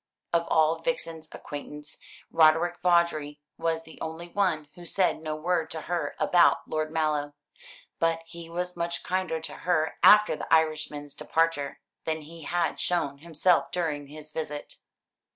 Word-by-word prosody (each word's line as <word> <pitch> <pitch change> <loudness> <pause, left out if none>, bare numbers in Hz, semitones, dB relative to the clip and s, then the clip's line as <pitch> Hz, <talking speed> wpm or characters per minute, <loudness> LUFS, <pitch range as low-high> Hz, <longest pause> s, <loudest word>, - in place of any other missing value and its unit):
Of 170 0 +2
all 160 +1 +3
Vixen's 165 -8 -3
acquaintance, 150 +1 -8 0.3
Roderick 165 +2 +4
Vawdrey 170 -4 +2 0.2
was 165 0 0
the 160 - -14
only 160 +2 -5
one 170 -6 0
who 175 - -12
said 180 -1 +1
no 155 -1 -3
word 165 +1 0
to 160 - -4
her 175 +1 -2
about 175 -1 +4
Lord 155 0 -2
Mallow; 150 -2 0 0.6
but 165 0 +1
he 165 0 -10
was 180 +1 -3
much 170 0 -2
kinder 185 -3 -1
to - - -5
her 165 -3 0
after 210 -4 +7
the - - -7
Irishman's 150 -2 +1
departure 165 -4 0 0.2
than 160 -1 -1
he 165 +2 -11
had 175 0 0
shown 145 -6 0
himself 170 +2 +2
during 150 -5 -2
his 155 +1 -11
visit. 150 -2 -5
160 Hz, 150 wpm, -27 LUFS, 155-170 Hz, 0.6 s, after